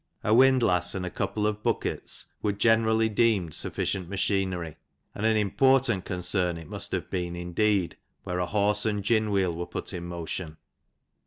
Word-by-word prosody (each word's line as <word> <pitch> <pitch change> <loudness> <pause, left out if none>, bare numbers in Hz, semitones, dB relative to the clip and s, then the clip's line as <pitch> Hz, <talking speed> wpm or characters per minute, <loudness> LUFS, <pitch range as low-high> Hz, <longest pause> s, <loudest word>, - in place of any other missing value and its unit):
a 105 - +2
windlass 120 -9 +4
and 95 -1 -3
a 90 - -4
couple 105 -1 -2
of 105 0 -1
buckets - - -2 0.2
would 105 -1 -1
generally 110 +1 +3
deemed 105 -7 +1
sufficient 90 -3 -2
machinery; 95 -4 -1 0.4
and 110 - -1
an 110 -1 +3
important 120 0 +2
c - - -3
cern 90 -1 0
it 80 - -11
must - - -6
have - - -3
been 90 -2 -2
indeed, 90 +2 0 0.3
where 90 0 -3
a 90 - 0
horse 105 +1 +1
an( 105 -2 -1
gin 110 +1 +2
wheel 95 -4 +1
were 85 +1 -4
put - - -5
in 85 - -5
motion. 85 -1 -5
100 Hz, 170 wpm, -27 LUFS, 90-110 Hz, 0.4 s, windlass